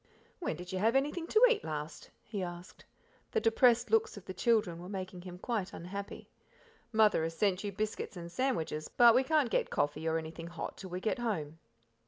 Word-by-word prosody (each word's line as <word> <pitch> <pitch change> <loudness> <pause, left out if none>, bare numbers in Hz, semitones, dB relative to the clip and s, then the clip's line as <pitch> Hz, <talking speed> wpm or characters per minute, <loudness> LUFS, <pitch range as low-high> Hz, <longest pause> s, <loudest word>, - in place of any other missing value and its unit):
"When 350 - -2
did 180 +1 -8
you 185 - -2
have 225 +5 +3
anything 295 +5 0
to 435 - +3
eat 475 -4 +1
last?" 150 0 -5
he 210 -3 -5
asked; 175 0 -7 0.5
the 450 - +1
depressed 250 - +4
looks 450 0 +2
of - - -10
the 185 - -6
children 210 -4 +1
were 180 +1 -8
making 185 -2 -5
him 180 0 -9
quite 210 -1 -3
unhappy. 200 +4 -7 0.6
"Mother 215 -5 +4
has 165 0 -3
sent 200 0 +1
you 205 - -2
biscuits 210 -1 -3
and 170 0 -7
sandwiches, 175 - -1
but 240 -1 +6
we, 255 +3 +4
can't 295 -4 +2
get - - +1
coffee 145 +2 -1
or 160 0 +2
anything 165 +1 -6
hot 170 -1 -6
till 190 - -9
we 180 +1 -4
get 225 +5 -1
home." 165 -10 -3
195 Hz, 200 wpm, -32 LUFS, 170-240 Hz, 0.6 s, but